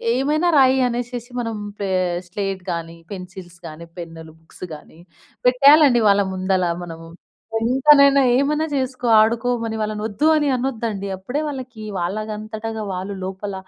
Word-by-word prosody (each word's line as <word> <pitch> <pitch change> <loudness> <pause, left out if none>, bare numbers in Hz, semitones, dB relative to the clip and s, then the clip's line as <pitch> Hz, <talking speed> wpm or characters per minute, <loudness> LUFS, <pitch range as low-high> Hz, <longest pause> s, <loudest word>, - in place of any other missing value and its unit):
ఏమైనా 305 +6 +1
రాయి 260 0 +4
అనేసేసి 245 0 -5
మనం 230 -1 -4 0.3
పే 200 - -1 0.4
స్లేట్ 195 -1 -3
గానీ, 165 0 -6 0.2
పెన్సిల్స్ 180 -2 -10
గానీ, 160 +2 -10
పెన్నులు, 165 -1 -9
బుక్స్ 165 +3 -10
గానీ, 155 +2 -16 0.5
పెట్టేయాలండి 275 -1 +6
వాళ్ళ 200 0 +4
ముందల 185 0 0 0.2
మనము. 165 0 -10 0.5
ఎంతనైనా 275 +3 +5 0.2
ఏమైనా 300 +3 +1
చేసుకో 255 -2 -2
ఆడుకోమని, 230 0 0
వాళ్ళనొద్దు 215 +6 -1
అని 295 -1 +1
అనొద్దండి. 230 -6 -3
అప్పుడే 250 +11 -3
వాళ్ళకీ 255 -6 -7 0.2
వాళ్ళంగంతటగా 215 +3 -4
వాళ్ళు 190 +2 -5
లోపల 195 +1 -5
220 Hz, 125 wpm, -21 LUFS, 190-260 Hz, 0.5 s, పెట్టేయాలండి